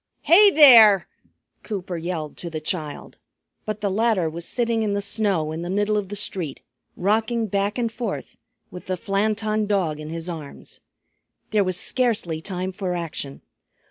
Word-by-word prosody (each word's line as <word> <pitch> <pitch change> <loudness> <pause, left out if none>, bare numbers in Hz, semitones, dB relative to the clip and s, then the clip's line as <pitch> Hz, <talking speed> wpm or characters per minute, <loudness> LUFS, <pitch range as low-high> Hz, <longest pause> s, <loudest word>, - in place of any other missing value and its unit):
"Hi 405 +5 +7
there!" 230 - +8 0.5
Cooper 190 -4 -5
yelled 165 -3 -4
to 175 - -6
the 160 -1 -5
child. 155 -2 -5 0.5
But 215 0 -4
the 200 -2 0
latter 215 -4 +1
was 170 +1 -7
sitting 235 -2 0
in 210 -2 0
the 200 - 0
snow 200 -6 0
in 160 +1 -5
the 175 - -5
middle 205 +2 0
of 205 -3 -2
the 205 - -5
street, 185 -7 -2 0.3
rocking 220 +4 +1
back 200 +1 -1
and 235 -2 -1
forth, 235 +1 -5 0.4
with 180 -1 -10
the 185 -1 -2
Flanton 215 +1 -1
Dog 180 -7 0
in 155 0 -7
his 165 +1 -5
arms. 160 -5 -8 0.7
There 210 -2 +3
was 185 -1 -1
scarcely 215 -12 0
time 185 0 -4
for 185 -1 -3
action. 160 -5 -5
195 Hz, 165 wpm, -23 LUFS, 170-215 Hz, 0.7 s, there